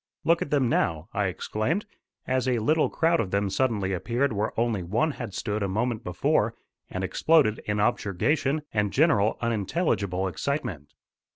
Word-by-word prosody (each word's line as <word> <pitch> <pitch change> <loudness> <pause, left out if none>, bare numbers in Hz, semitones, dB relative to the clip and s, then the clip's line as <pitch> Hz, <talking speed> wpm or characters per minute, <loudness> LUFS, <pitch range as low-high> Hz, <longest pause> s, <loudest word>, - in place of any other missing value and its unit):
"Look 170 +1 +3
at - - -2
them 140 -4 +2
now," 85 -7 0
I 100 -1 +1
exclaimed, 110 - -2 0.4
as 130 0 0
a 125 -2 +2
little 155 +8 +2
crowd 165 +1 +2
of 100 - -1
them 100 0 0
suddenly 100 -4 0
appeared 120 +8 0
where 105 +1 -1
only 115 -4 +1
one 110 - 0
had 120 -8 -7
stood 105 +1 -2
a 100 - 0
moment 115 +4 -1
before, 90 0 +1 0.3
and 95 - -4
exploded 135 - +3
in 105 0 -1
objurgation 135 - +1
and 105 -2 +1
general 130 -8 +3
unintelligible 100 - 0
excitement. 95 - -4
110 Hz, 160 wpm, -26 LUFS, 100-140 Hz, 0.4 s, Look